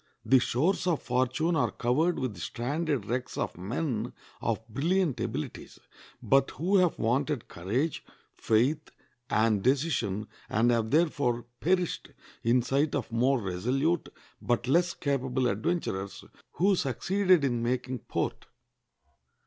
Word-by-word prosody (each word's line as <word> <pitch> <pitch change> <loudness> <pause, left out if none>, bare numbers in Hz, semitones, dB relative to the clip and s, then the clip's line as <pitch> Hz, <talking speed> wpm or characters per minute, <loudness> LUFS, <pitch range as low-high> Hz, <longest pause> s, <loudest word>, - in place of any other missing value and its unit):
The 130 +4 +6
shores 160 +11 +1
of 170 -4 +2
fortune 130 +7 +1
are - - +2
covered 155 +9 +1
with 130 -4 -2
the 90 - -12
stranded 140 - -2
wrecks 125 +3 -3
of - - -2
men 120 - -3 0.3
of 115 -1 -2
brilliant 155 - 0
abilities, 115 -9 -5 0.5
but 135 0 +3
who 190 +5 +1
have 180 -3 +3
wanted 135 +3 0
courage, 120 - -2 0.3
faith, 120 +7 +1 0.4
and 110 -2 +2
decision, 125 - +1 0.2
and 115 +3 +3
have 115 -2 +1
therefore 140 -6 +1
perished 180 0 0 0.3
in 120 +1 +3
sight 140 +4 +1
of 125 -5 -3
more 125 +3 +2
resolute, 125 - 0 0.3
but 120 0 0
less 170 +5 +3
capable 130 -2 -1
adventurers, 100 - -2 0.3
who 195 +3 +3
succeeded 180 - +2
in 120 -4 +1
making 125 +1 -1
port. - - -3
130 Hz, 125 wpm, -29 LUFS, 115-155 Hz, 0.5 s, The